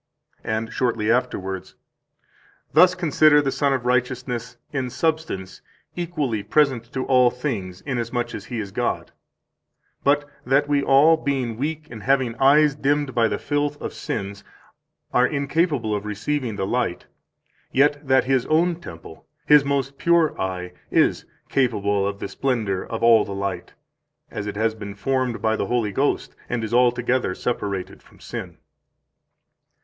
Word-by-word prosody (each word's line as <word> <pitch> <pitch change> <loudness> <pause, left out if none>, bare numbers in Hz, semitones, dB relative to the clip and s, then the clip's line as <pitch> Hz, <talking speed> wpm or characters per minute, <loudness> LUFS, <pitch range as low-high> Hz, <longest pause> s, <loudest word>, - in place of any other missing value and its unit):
167 110 -1 -2
And 115 - -12
shortly 115 -3 0
afterwards: 95 -7 -2 1.0
"Thus 180 +4 +6
consider 155 -3 +4
the 140 -2 0
Sun 140 0 +1
of 130 -2 -2
Righteousness 125 -1 -1 0.2
in 130 -3 -1
substance 155 - -2 0.3
equally 155 -11 -2
present 120 +1 +1
to 130 -1 -2
all 125 -2 +5
things, 110 -9 -4
inasmuch 120 -2 -3
as - - -7
He 120 - -5
is 100 -2 -5
God; - - -2 0.9
but 145 +1 +2 0.2
that 135 +3 +2
we 145 -1 +2
all, 145 +4 +5
being 135 -6 -2
weak 150 +5 -3
and 110 -3 -8
having 130 -2 +1
eyes 145 +3 +5
dimmed 145 -1 0
by 115 -2 +3
the - - -2
filth 145 0 -1
of - - -5
sins, 100 +1 -5 0.7
are 125 +1 +4
incapable 140 -5 0
of 105 +1 -4
receiving 115 +3 -2
the 95 - -2
light, 120 -5 -1 0.7
yet 145 +1 +2
that 130 0 +4
His 130 -1 +1
own 165 +2 +2
temple, 85 - -11 0.2
His 150 -1 +6
most 140 -1 -2
pure 170 -2 +3
eye, 90 -1 -3 0.2
is - - +2 0.2
capable 100 -6 +1
of 100 0 -3
the 100 - -5
splendor 110 -7 -1
of 115 0 -5
all 115 -2 +6
the 100 - -6
light, 100 -2 -4 0.6
as 105 - -5
it 105 - -4
has 110 +1 +1
been 100 -2 -8
formed 130 +1 -1
by 110 0 +2
the - - -2
Holy 120 -4 0
Ghost 140 +8 -1
and 120 -2 -2
is 110 +1 -4
altogether 125 -3 +2
separated 100 -6 -3
from - - -22
sin." - - -7
125 Hz, 155 wpm, -23 LUFS, 110-145 Hz, 1.0 s, Thus